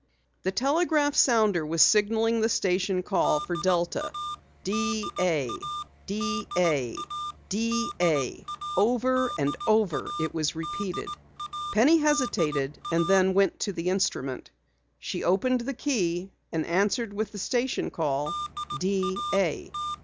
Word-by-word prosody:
The 190 Hz, -, -1 dB
telegraph 290 Hz, -, +2 dB
sounder 215 Hz, -, +4 dB
was 160 Hz, +2 st, -2 dB
signaling 225 Hz, +2 st, +3 dB
the 225 Hz, -, +2 dB
station 185 Hz, -2 st, +1 dB
call 180 Hz, -5 st, +2 dB
for 175 Hz, -, -3 dB
Delta: 185 Hz, +12 st, 0 dB, 0.5 s
"D 220 Hz, +1 st, -1 dB
A, 170 Hz, -5 st, +1 dB, 0.6 s
D 200 Hz, 0 st, -2 dB
A, 150 Hz, -8 st, +2 dB, 0.5 s
D 230 Hz, +4 st, 0 dB
A." 150 Hz, -7 st, +1 dB, 0.3 s
Over 250 Hz, +2 st, +2 dB
and 140 Hz, +1 st, 0 dB
over 215 Hz, -, +2 dB
it -, -, -2 dB
was 155 Hz, -2 st, -1 dB
repeated. 185 Hz, +3 st, -4 dB, 0.7 s
Penny 305 Hz, +9 st, +6 dB
hesitated 170 Hz, -, +1 dB
and 170 Hz, 0 st, +2 dB
then 190 Hz, -1 st, +4 dB
went 195 Hz, 0 st, +3 dB
to 205 Hz, -, -1 dB
the 170 Hz, +1 st, -2 dB
instrument. 185 Hz, -9 st, -1 dB, 0.5 s
She -, -, -4 dB
opened 245 Hz, +8 st, +2 dB
the 270 Hz, +3 st, -4 dB
key 190 Hz, -, -1 dB, 0.2 s
and 160 Hz, -1 st, -1 dB
answered 205 Hz, +5 st, +1 dB
with 215 Hz, +1 st, -3 dB
the 210 Hz, -, -8 dB
station 245 Hz, +5 st, -1 dB
call, 145 Hz, -3 st, -1 dB, 0.5 s
"D 195 Hz, 0 st, 0 dB, 0.2 s
A." 185 Hz, -6 st, 0 dB
195 Hz, 125 wpm, -27 LUFS, 170-235 Hz, 0.7 s, Penny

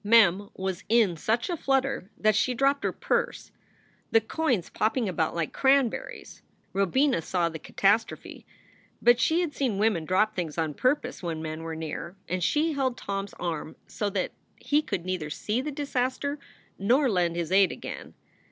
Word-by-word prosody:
Mem 205 Hz, -2 st, +5 dB
was 190 Hz, 0 st, -3 dB
in 220 Hz, -6 st, +4 dB
such 220 Hz, +9 st, 0 dB
a 355 Hz, -, -1 dB
flutter 270 Hz, -, 0 dB
that 215 Hz, -1 st, +3 dB
she 250 Hz, +3 st, +2 dB
dropped 275 Hz, +3 st, +2 dB
her -, -, +1 dB
purse, -, -, -2 dB, 0.6 s
the 225 Hz, -, +5 dB
coins 230 Hz, -, -1 dB
popping 225 Hz, +1 st, 0 dB
about 165 Hz, -4 st, -1 dB
like 165 Hz, -2 st, -2 dB
cranberries. 270 Hz, -3 st, +1 dB, 0.3 s
Robina 220 Hz, -, +2 dB
saw 170 Hz, 0 st, 0 dB
the 160 Hz, -1 st, -7 dB
catastrophe, 210 Hz, +7 st, 0 dB, 0.6 s
but 240 Hz, 0 st, +5 dB
she 325 Hz, +6 st, +3 dB
had 335 Hz, -4 st, -2 dB
seen 255 Hz, -9 st, -1 dB
women 205 Hz, -5 st, +2 dB
drop 210 Hz, +6 st, +2 dB
things 170 Hz, -4 st, -3 dB
on 160 Hz, -2 st, 0 dB
pur 255 Hz, -, +3 dB
pose 250 Hz, -3 st, -9 dB
when 165 Hz, -3 st, -3 dB
men 155 Hz, 0 st, -5 dB
were 165 Hz, 0 st, -5 dB
near, 160 Hz, +2 st, -5 dB
and 185 Hz, 0 st, -2 dB
she 310 Hz, -, +2 dB
held 260 Hz, -4 st, 0 dB
Tom 195 Hz, 0 st, -3 dB
s 200 Hz, -, -15 dB
arm 160 Hz, -3 st, -3 dB
so 210 Hz, -, -3 dB
that 190 Hz, -2 st, -2 dB, 0.2 s
he 295 Hz, +1 st, +1 dB
could 180 Hz, -, -4 dB
neither 180 Hz, -5 st, -2 dB
see 215 Hz, -, -2 dB
the 300 Hz, -, -4 dB
disaster 280 Hz, 0 st, -2 dB, 0.4 s
nor 255 Hz, +8 st, +3 dB
lend 175 Hz, -6 st, +1 dB
his 170 Hz, 0 st, -3 dB
aid 195 Hz, -1 st, +5 dB
again. -, -, -8 dB
210 Hz, 175 wpm, -27 LUFS, 175-260 Hz, 0.6 s, Mem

